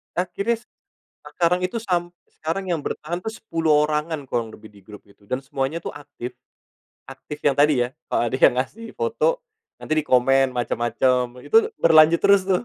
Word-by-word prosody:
Akhirnya 200 +6 -1 0.6
sekarang 180 +1 0
itu 185 +6 -4
sampai 175 -4 -1 0.3
sekarang 165 +5 -2
yang 160 - -2
bertahan 175 +4 -4
tuh 220 - -4
10 160 -8 +1
orangan 150 -1 -2
kurang 115 -2 -1
lebih 110 0 -13
di 100 - -17
grup 105 +1 -12
itu 100 0 -23
dan 130 - -1
semuanya 135 +2 -2
tuh - - -6
aktif, 145 -4 -9 0.7
aktif 150 - -9
yang 140 - +3
tadi 145 -2 +3
ya. - - -9
Heeh, - - -62
kalau - - +1
ada 130 - -3 0.2
ngasih 225 - -12
foto 475 +2 0 0.4
nanti - - -5
dikomen 135 0 +3
macem-macem, 125 +1 0
itu 450 0 +4
berlanjut 160 +1 +6
terus 200 -1 +5
tuh, 185 -2 +1
155 Hz, 165 wpm, -23 LUFS, 130-180 Hz, 0.7 s, berlanjut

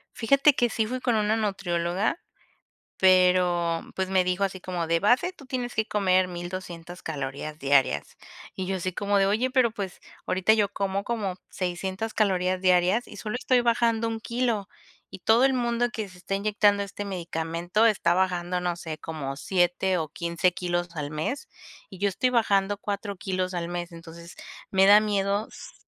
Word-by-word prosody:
Fíjate 275 +5 +4
que 245 -2 +1
sí 220 -1 0
fui 255 +2 -3
con 245 -3 +1
una 215 0 +2
nutrióloga, 195 - -1 0.8
pero 180 -2 +3
pues, 190 0 -2
me 190 -1 +2
dijo 185 +2 0
así 190 -1 -3
como: 180 -2 -3
"De 165 +1 +2
base, 245 - +2
tú 310 - -15
tienes 245 -2 -3
que 220 0 0
comer 185 -3 +2
1200 175 -1 -7
calorías 150 0 -5
diarias". 135 - +1 0.4
Y 190 - -3
yo 190 0 -1
así 185 0 -3
como 200 +2 0
de: 195 - +3
"Oye, 225 +6 +1
pero 255 -3 +3
pues, 200 -4 -6 0.3
ahorita 190 +4 +3
yo 210 -2 +2
como 195 0 -2
como 205 -6 -2
600 190 +4 -3
calorías 185 -3 +1
diarias, 185 +5 +3
y - - -12
solo 215 +2 -4
estoy 255 -1 +2
bajando 230 -1 +2
un 225 0 -4
kilo, 235 -5 -1 0.4
y 190 - -10
todo 230 +3 +4
el 270 - +4
mundo 240 -1 0
que 220 -4 -5
se 180 -1 -15
está 190 +2 -4
inyectando 205 0 +2
este 200 +1 -6
medicamento 175 +2 -1
está 195 -6 +2
bajando, 180 -1 0
no 175 -1 -1
sé, 160 -2 -6
como 140 -4 -5
7 180 +2 +1
o 155 -2 -3
15 170 +2 0
kilos, 175 -1 -2
al 145 -1 -3
mes. 160 - -3 0.4
Y 190 - -11
yo 200 0 +2
estoy 250 +6 0
bajando 205 -4 +2
4 205 0 -4
kilos 185 -1 -2
al 170 -1 -3
mes". 175 0 -5
Entonces, 170 +1 -11 0.4
me 190 0 +4
da 205 +1 +9
miedo, 205 0 0
s - - -11
190 Hz, 180 wpm, -26 LUFS, 175-215 Hz, 0.8 s, da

